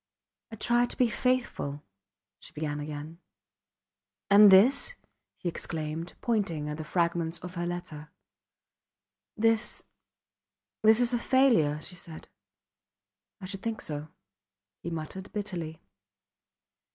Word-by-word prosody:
I - - -6
tried 240 +2 +2
to - - -5
be 250 -2 +3
faithful... 225 - -1 0.6
she - - -12
began 150 -1 -3
again. 150 +2 -7 1.1
And 205 +1 +9
this? 250 - +6 0.4
he - - -5
exclaimed, 165 0 -4
pointing 195 -10 -1
at 150 - -4
the 155 - -5
fragments 170 0 -1
of 180 -1 -7
her 175 -1 -3
letter. 160 -4 -6 1.3
This 225 +1 +1 1.0
this 220 +1 +6
is 245 0 +3
a 240 - +1
failure, 235 - +3
she 180 - -9
said. 165 -2 -9 1.1
I - - -6
should 195 +1 -5
think 225 0 -3
so, 150 0 -6 0.7
he 170 - -5
muttered, 165 +4 -6
bitterly. 175 -7 -5
175 Hz, 115 wpm, -28 LUFS, 155-220 Hz, 1.3 s, And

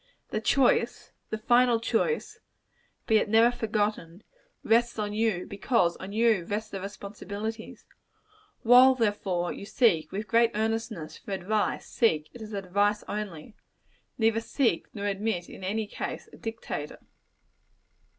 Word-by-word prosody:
The 215 - -1
choice 460 - +2 0.2
the 220 - -2
final 240 0 +3
choice 230 - -1 0.7
be 220 - +4
it 210 - 0
never 230 +3 +5
forgotten, 210 -5 -2 0.4
rests 235 +1 +2
on 210 -1 -2
you: 215 -4 0
because 200 -4 +1
on 190 +1 -8
you 220 -3 +3
rests 210 +3 -4
the 195 - -5
responsibilities. 205 +2 -7 0.8
While, 250 +3 +7
therefore, 200 -6 -1
you 200 - -9
seek, 210 -9 +2
with 210 +2 -4
great 230 +3 +4
earnestness, 220 -6 -3
for 200 - -7
advice, 205 +3 -1
seek 155 -10 +1
it 240 - -11
as 215 0 -8
advice 200 +2 0
only. 205 -3 -5 0.6
Neither 225 0 +2
seek, 235 - 0
nor 205 -1 -4
admit, 200 -2 -1
in - - -11
any 215 +4 -1
case, 205 - -6
a - - -12
dictator. 225 -10 -5
215 Hz, 135 wpm, -28 LUFS, 195-230 Hz, 0.8 s, While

